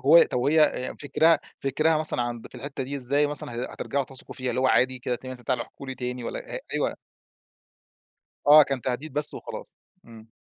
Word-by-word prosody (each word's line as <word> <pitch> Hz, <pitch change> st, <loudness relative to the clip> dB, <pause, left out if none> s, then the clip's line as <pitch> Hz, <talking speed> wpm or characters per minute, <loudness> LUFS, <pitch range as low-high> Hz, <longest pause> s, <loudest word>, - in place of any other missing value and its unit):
هو 165 Hz, +5 st, +8 dB
طب 125 Hz, -, 0 dB
وهي 150 Hz, +5 st, +3 dB
آآ 130 Hz, -3 st, 0 dB
فكِرها 155 Hz, +2 st, +4 dB, 0.2 s
فكِرها 155 Hz, +4 st, +2 dB
مثلًا 155 Hz, -5 st, -1 dB
عند 120 Hz, -1 st, -4 dB
في -, -, -25 dB
الحِتّة 140 Hz, -1 st, -5 dB
دي 140 Hz, +2 st, -4 dB
إزاي 140 Hz, +3 st, +2 dB
مثلًا 145 Hz, -4 st, -5 dB
ه 120 Hz, +2 st, -4 dB
هترجعوا 140 Hz, -1 st, -2 dB
تثقوا 135 Hz, -1 st, -10 dB
فيها؟ 130 Hz, -1 st, -3 dB
اللي 125 Hz, +2 st, -1 dB
هو 130 Hz, -, +3 dB
عادي 130 Hz, 0 st, +3 dB
كده 125 Hz, 0 st, -2 dB
ت 130 Hz, -, -9 dB
مثلًا 125 Hz, -2 st, -8 dB
تعالوا 125 Hz, -1 st, 0 dB
احكوا 140 Hz, -, -12 dB
لي 130 Hz, -, -4 dB
تاني 125 Hz, -1 st, -4 dB
والّا -, -, -4 dB
هأ -, -, -3 dB
أيوه. -, -, 0 dB, 1.5 s
آه، 150 Hz, +1 st, +10 dB
كان 135 Hz, -3 st, -3 dB
تهديد 135 Hz, +3 st, -3 dB
بس 150 Hz, 0 st, +2 dB
وخلاص، -, -, -8 dB, 0.3 s
إمم. 110 Hz, -1 st, -14 dB
130 Hz, 205 wpm, -26 LUFS, 125-145 Hz, 1.5 s, آه